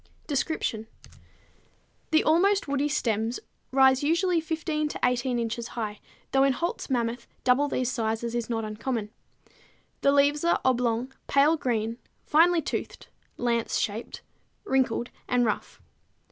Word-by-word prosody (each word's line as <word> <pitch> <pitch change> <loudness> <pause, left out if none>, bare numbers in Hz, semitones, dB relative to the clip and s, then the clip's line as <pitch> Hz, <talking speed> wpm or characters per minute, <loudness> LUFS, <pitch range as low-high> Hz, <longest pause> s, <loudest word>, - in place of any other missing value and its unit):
Description. 265 -6 -2 1.2
The 315 -1 +4
almost 390 +5 +3
woody 280 +1 0
stems 225 -3 0 0.3
rise 265 0 +5
usually 340 +3 +2
15 315 -1 -2
to - - -6
18 250 0 +1
inches 230 0 -3
high, 210 -2 -3 0.3
though 270 0 +4
in 275 -1 +4
Holt's 340 +4 -3
Mammoth 235 -2 -1 0.2
double 255 +4 +3
these 255 -3 -1
sizes 225 0 -2
is 240 -1 -2
not 225 -2 -1
uncommon. 215 0 -3 0.9
The 280 - +4
leaves 285 +2 +3
are 340 - +3
oblong, 250 0 +1
pale 285 +3 +4
green, 230 -5 -2 0.3
finely 330 +2 +4
toothed, - - -5 0.3
lance 235 -1 0
shaped, 215 +3 -3 0.4
wrinkled 255 - 0 0.2
and 245 -1 +2
rough. 215 - -3
255 Hz, 130 wpm, -27 LUFS, 230-295 Hz, 1.2 s, rise